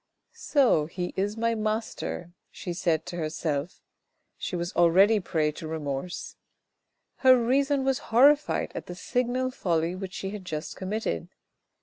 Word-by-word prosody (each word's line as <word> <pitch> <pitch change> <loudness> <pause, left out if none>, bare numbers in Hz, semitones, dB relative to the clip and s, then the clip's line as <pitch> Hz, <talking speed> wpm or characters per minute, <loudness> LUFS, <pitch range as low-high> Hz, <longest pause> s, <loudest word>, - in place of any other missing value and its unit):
"So 280 - +2
he 175 +2 -4
is 205 +3 -1
my 230 0 +1
master," 215 -5 -3 0.2
she 175 - -6
said 165 -3 0
to 180 -1 -6
herself, 155 -1 -3 0.5
she - - -4
was 175 0 -3
already 190 +6 +5
a - - -2
prey 155 -3 0
to 155 +1 -8
remorse. 155 +1 -4 0.8
Her 260 -1 +6
reason 275 +3 +2
was 270 -1 +1
horrified 285 +6 +4
at - - -6
the 175 - -6
signal 250 +5 -1
folly 170 -6 0
which 185 0 -6
she 195 0 -4
had 205 -2 -7
just 155 -3 -5
committed. 190 - -3
190 Hz, 145 wpm, -27 LUFS, 165-235 Hz, 0.8 s, Her